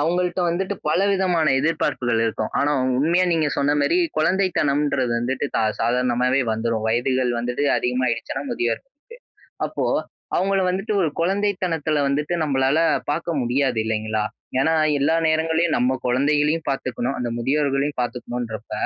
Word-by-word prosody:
அவுங்கள்ட்ட 175 +3 0
வந்துட்டு 190 +4 -2
பல 155 - +2
விதமான 180 -4 +1
எதிர்பார்ப்புகள் 135 -6 0
இருக்கும். 110 -1 -2
ஆனா, 145 - +2
உ - - +1
உண்மையா 170 +6 +3
நீங்க 160 -2 +1
சொன்ன 140 +1 +2
மேரி, 345 - +2 0.2
குழந்தைத்தனம்ன்றது 145 -8 +1
வந்துட்டு 130 +4 -2
ச - - +2 0.2
சாதாரணமாவே 125 +2 +1
வந்துரும். 110 0 -1
வயதுகள் 125 +2 +1
வந்துட்டு 125 +4 -2
அதிகமாயிடுச்சுனா 125 +1 -1
முதியோருக்கு. 120 - -2 0.8
அப்போ - - -3 0.5
அவுங்கள 195 +1 +1
வந்துட்டு 195 +3 -2
ஒரு 160 - +1
குழந்தைத்தனத்துல 180 -5 0
வந்துட்டு, 145 +4 -1
நம்மளால 135 0 +1 0.3
பார்க்க 165 +2 -1
முடியாது, 125 0 0
இல்லைங்களா? 110 -1 -1 0.4
ஏன்னா, 160 +4 +2 0.3
எல்லா 155 +4 +2
நேரங்கள்லயும் 160 +1 +1
நம்ம 125 +2 +1
குழந்தைகளையும் 150 +5 +1
பார்த்துக்கணும், 130 -1 -2
அந்த 120 -1 -2
முதியோர்களையும் 140 +2 0
பார்த்துக்கணும்ன்றப்ப, 120 -2 -5
140 Hz, 125 wpm, -22 LUFS, 125-165 Hz, 0.8 s, உண்மையா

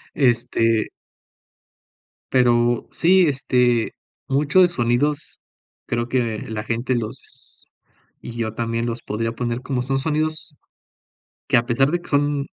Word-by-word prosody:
Este 120 -4 +2 1.4
pero 120 -2 +3
sí, 180 +1 +4
este, 125 -4 +1 0.4
mucho 145 +6 +3
de 175 - +6
sonidos 140 +1 -1 0.5
creo 120 0 -2
que 120 -4 -1
la 110 -1 -4
gente 120 +3 -1
los 115 +3 -8 0.5
y 120 - -8
yo 110 -1 -2
también 115 0 -2
los 120 0 -4
podría 115 +2 -3
poner, 120 0 -3
como 130 -1 -2
son 135 +1 -1
sonidos 155 +1 -2 0.9
que 135 - +4
a 120 - +3
pesar 135 +4 +2
de 175 0 0
que - - -12
son 145 -1 +1
125 Hz, 130 wpm, -21 LUFS, 115-145 Hz, 1.4 s, de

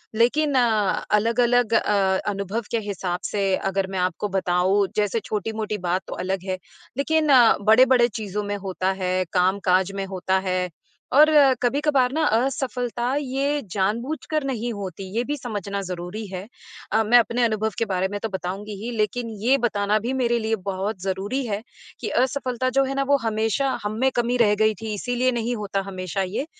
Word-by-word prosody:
लेकिन 280 +5 +2
अलग-अलग 230 +1 +2
अ, 195 -3 +2
अनुभव 200 +3 -3
के 230 - +1
हिसाब 180 -2 -3
से 195 -2 +1 0.2
अगर 190 0 -1
मैं 190 - -2
आपको 180 +3 -1
बताऊँ, 190 +1 +2
जैसे 210 +1 +1
छोटी-मोटी 215 0 -3
बात 180 +2 +1
तो - - -5
अलग 190 -1 -2
है, 185 - -1 0.4
लेकिन 310 +2 +1 0.4
बड़े-बड़े 245 +2 +6
चीज़ों 210 -2 -4
में 205 0 -3
होता 185 0 0
है, 185 0 +1
काम-काज 185 0 +2
में 195 0 -2
होता 190 0 -1
है 185 0 0 0.4
और 305 +3 +7 0.3
कभी-कभार 265 0 +2
ना 320 - 0
असफलता, 250 0 -1
ये 280 +1 -1
जानबूझकर 240 +10 -1
नहीं 240 -3 -2
होती, 195 -2 -6
ये 240 - +1
भी 290 +3 -2
समझना 205 -5 -4
ज़रूरी 180 +3 -5
है। 185 +1 -6 0.5
अ, 220 +1 +3
मैं 235 +3 +5
अपने 235 +1 +1
अनुभव 220 -1 +1
के 230 - +1
बारे 190 -1 0
में 205 - -3
तो 225 - -1
बताऊँगी 195 +2 -5
ही, 240 - -3
लेकिन 230 +2 -1
ये 260 +4 +4
बताना 210 -3 +1
भी 240 +5 -3
मेरे 240 -2 +1
लिए 220 0 0
बहुत 195 0 -3
ज़रूरी 195 +8 -2
है 210 -1 -2 0.4
कि - - -3
असफलता 255 -1 0
जो 275 - +6
है 270 +1 -3
ना, 275 - +1
वो 280 +1 +3
हमेशा 225 +4 0
हम 210 +1 -3
में 265 +1 +3
कमी 240 +1 +1
रह 215 -3 +4
गई 215 0 +4
थी, 220 -1 -3
इसीलिए 245 +4 0
नहीं 240 0 -1
होता 200 -2 -2
हमेशा 185 0 -3
ये। 220 +10 -3
215 Hz, 175 wpm, -23 LUFS, 195-245 Hz, 0.5 s, और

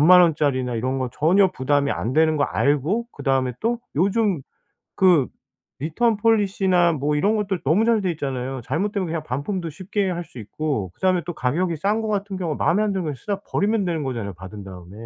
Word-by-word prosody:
만 180 +4 +8
원짜리나 140 -7 +1
이런 130 +4 -1
거는 130 -1 -2
전혀 180 +7 +3
부담이 140 -1 +1
안 115 - -3
되는 155 +2 +3
거 145 - +1
알고 150 - 0
그다음에 135 -2 0
또 235 +1 0 0.2
요즘 195 -2 +1 0.5
그 180 -8 +4 0.5
return 210 - +1
policy나 190 -5 +3
뭐 150 0 -1
이런 200 +9 +2
것들 200 -4 -1
너무 165 +10 +3
잘 230 -2 +3
돼 185 -2 0
있잖아요. 135 -4 -4
잘못되면 195 - -1
그냥 160 -1 -3
반품도 165 +7 -3
쉽게 190 +5 -2
할 175 -1 -3
수 - - -16
있고 110 - -3
그다음에 185 -2 +1
또 175 - -4
가격이 165 +6 -1
싼 205 +7 0
거 220 - -3
같은 200 -1 -2
경우 170 -5 -2
마음에 205 +9 +2
안 210 - 0
드는 190 -3 -2
거 150 - -2
쓰다 200 +9 -4
버리면 205 -1 +1
되는 165 -3 -1
거잖아요, 115 -7 -4
받은 95 +3 -10
다음에. 90 -2 -11
165 Hz, 425 characters per minute, -23 LUFS, 135-195 Hz, 0.5 s, 만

